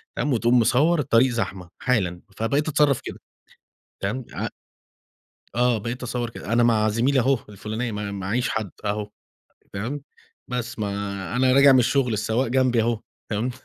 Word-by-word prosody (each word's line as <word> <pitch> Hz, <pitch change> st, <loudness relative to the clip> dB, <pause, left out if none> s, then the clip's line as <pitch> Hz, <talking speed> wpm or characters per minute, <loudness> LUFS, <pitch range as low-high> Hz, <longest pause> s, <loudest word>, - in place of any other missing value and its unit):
تمام 145 Hz, -2 st, 0 dB
وتقوم 120 Hz, +1 st, +3 dB
مصوّر 145 Hz, +8 st, +3 dB
الطريق 130 Hz, -2 st, +3 dB
زحمة 95 Hz, -6 st, -3 dB
حالًا، 95 Hz, -9 st, 0 dB, 0.2 s
فبقيت 140 Hz, +7 st, 0 dB
أتصرّف 145 Hz, -3 st, +3 dB
كده -, -, -7 dB, 0.8 s
تمام، 115 Hz, +5 st, -2 dB
ع -, -, -2 dB, 1.1 s
آه، 120 Hz, -1 st, +2 dB
بقيت 120 Hz, +5 st, -5 dB
أصوّر 120 Hz, -1 st, -3 dB
كده، 115 Hz, -, -7 dB
أنا 120 Hz, 0 st, +4 dB
مع 110 Hz, -2 st, +3 dB
زميلي 125 Hz, +5 st, +2 dB
أهو 130 Hz, +1 st, +2 dB
الفلاني 110 Hz, +3 st, -4 dB
ما 105 Hz, -1 st, -4 dB
معيش 100 Hz, +6 st, -1 dB
حد 110 Hz, -5 st, -2 dB
أهو، 105 Hz, 0 st, -2 dB, 0.6 s
تمام، 125 Hz, +9 st, -4 dB, 0.5 s
بس 120 Hz, -2 st, -4 dB
ما 105 Hz, -1 st, -1 dB, 0.5 s
أنا 130 Hz, 0 st, +4 dB
راجع 140 Hz, 0 st, +7 dB
من 130 Hz, -, +6 dB
الشغل 125 Hz, 0 st, +2 dB
السواق 110 Hz, +4 st, 0 dB
جنبي 125 Hz, -2 st, +2 dB
أهو 115 Hz, -1 st, 0 dB, 0.3 s
تمام. 115 Hz, +4 st, -1 dB
120 Hz, 155 wpm, -24 LUFS, 110-130 Hz, 1.1 s, راجع